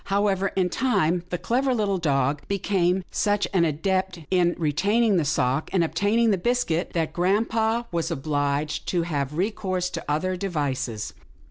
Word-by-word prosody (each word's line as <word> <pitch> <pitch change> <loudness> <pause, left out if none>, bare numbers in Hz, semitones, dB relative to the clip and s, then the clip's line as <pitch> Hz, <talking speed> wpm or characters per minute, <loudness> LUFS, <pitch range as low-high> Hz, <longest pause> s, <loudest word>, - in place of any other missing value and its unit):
However, 195 -1 +1
in 185 -2 +2
time, 180 -9 +1
the 175 - -2
clever 255 +6 0
little 200 -4 0
dog 140 -2 +1
became 190 -2 +1
such 205 -1 +1
an 175 -3 +4
adept 185 +3 -1
in 175 -2 +3
retaining 195 +8 +2
the 160 - +1
sock, 135 +2 0
and 180 -3 +2
obtaining 215 +7 +2
the 195 - +1
biscuit, 180 -6 0
that 160 -2 -1
grampa 220 +5 +1
was 170 -1 -1
obliged 145 -1 -1
to 175 -2 +1
have 150 -3 -3
recourse 185 -2 -1
to - - -5
other 185 +5 0
devices. 145 - -3
180 Hz, 150 wpm, -25 LUFS, 155-200 Hz, -, an